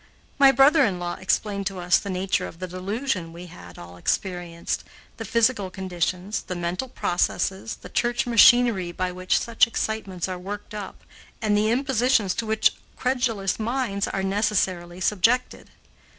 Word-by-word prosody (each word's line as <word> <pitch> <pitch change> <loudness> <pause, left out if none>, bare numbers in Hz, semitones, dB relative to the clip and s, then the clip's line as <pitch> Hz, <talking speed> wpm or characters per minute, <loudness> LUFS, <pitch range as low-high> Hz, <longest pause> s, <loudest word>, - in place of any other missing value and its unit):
My 275 -1 +8
brother 275 +3 +5
in 195 -7 +1
law 175 0 -3
explained 200 +1 0
to 195 -2 -4
us 180 0 +3
the 200 - -7
nature 185 0 -1
of - - -12
the 185 +1 -5
delusion 185 0 -3
we 170 +2 -10
had 90 - -13
all 85 0 -11
experienced, 175 - -2 0.3
the - - -6
physical 230 -4 +1
conditions, 185 +1 -3
the 185 - -6
mental 175 +8 -3
processes, 190 -1 -1
the - - -12
church 240 0 0
machinery 235 -5 +5
by 185 +1 -2
which 185 0 0
such 235 +1 +3
excitements 215 -6 -3
are 185 -1 -5
worked 205 +3 -7
up, 205 -2 -7 0.4
and 215 -2 +1
the 210 +1 +2
impositions 250 -5 +2
to 230 - -4
which 220 0 +3 0.2
credulous 245 -7 -1
minds 220 -3 -1
are 195 - -2
necessarily 190 -3 -1
subjected. 225 +7 +1
195 Hz, 155 wpm, -24 LUFS, 180-230 Hz, 0.4 s, My